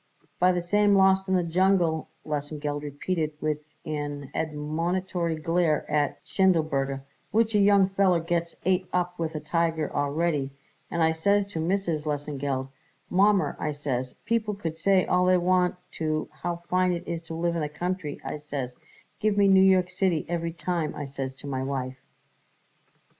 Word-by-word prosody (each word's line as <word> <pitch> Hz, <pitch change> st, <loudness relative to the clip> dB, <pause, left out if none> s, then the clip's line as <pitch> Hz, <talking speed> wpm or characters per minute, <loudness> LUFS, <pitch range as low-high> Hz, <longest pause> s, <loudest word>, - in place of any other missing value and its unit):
"By 180 Hz, +1 st, +5 dB
the 175 Hz, -1 st, -2 dB
name 205 Hz, -1 st, +5 dB
Lawst 190 Hz, 0 st, +4 dB
in 190 Hz, -, +2 dB
the 180 Hz, -, +2 dB
Jungle," 170 Hz, -2 st, +2 dB, 0.2 s
Lesengeld 145 Hz, 0 st, -3 dB
repeated 155 Hz, +2 st, -2 dB
with 150 Hz, -1 st, -1 dB, 0.3 s
an 145 Hz, -2 st, -4 dB
admonitory 165 Hz, +3 st, -1 dB
glare 165 Hz, 0 st, +1 dB
at 145 Hz, -1 st, +1 dB
Schindelberger, 150 Hz, -8 st, +1 dB, 0.3 s
"which 225 Hz, +1 st, +2 dB
a 210 Hz, -, +4 dB
young 200 Hz, -1 st, +5 dB
feller 190 Hz, -3 st, +3 dB
gets 170 Hz, 0 st, -2 dB
ate 185 Hz, 0 st, +2 dB
up 180 Hz, -1 st, -1 dB
with 160 Hz, -1 st, -2 dB
a -, -, -1 dB
tiger 165 Hz, -1 st, -1 dB
already; 145 Hz, 0 st, 0 dB, 0.4 s
and 170 Hz, -1 st, 0 dB
I 160 Hz, -, +4 dB
says 200 Hz, +5 st, +2 dB
to 165 Hz, -, -4 dB
Mrs. 165 Hz, -3 st, -1 dB
Lesengeld: 145 Hz, -2 st, -2 dB, 0.4 s
'Mommer,' 200 Hz, +1 st, +3 dB
I 150 Hz, -, -1 dB
says, 130 Hz, -3 st, -3 dB
'people 220 Hz, -2 st, 0 dB
could 165 Hz, -5 st, -4 dB
say 190 Hz, +2 st, +3 dB
all 180 Hz, 0 st, +2 dB
they 185 Hz, 0 st, +5 dB
want 180 Hz, 0 st, +2 dB, 0.2 s
to 155 Hz, -1 st, -1 dB
how 175 Hz, -1 st, -5 dB
fine 185 Hz, 0 st, +2 dB
it 175 Hz, +1 st, -5 dB
is 170 Hz, -1 st, -3 dB
to 165 Hz, -, -6 dB
live 170 Hz, +1 st, 0 dB
in 170 Hz, -, -1 dB
the 150 Hz, -, -2 dB
country,' 175 Hz, 0 st, -3 dB
I 150 Hz, -, -4 dB
says, 140 Hz, -4 st, -4 dB, 0.5 s
'give 215 Hz, -1 st, +1 dB
me 200 Hz, -1 st, +5 dB
New 190 Hz, -1 st, +6 dB
York 185 Hz, -1 st, +4 dB
City 180 Hz, -3 st, +1 dB
every 170 Hz, -1 st, -2 dB
time,' 170 Hz, -2 st, -2 dB
I 145 Hz, -1 st, -4 dB
says 135 Hz, -1 st, -5 dB
to 135 Hz, -, -12 dB
my 130 Hz, -2 st, -2 dB
wife." 130 Hz, -1 st, -3 dB
165 Hz, 170 wpm, -27 LUFS, 150-185 Hz, 0.5 s, New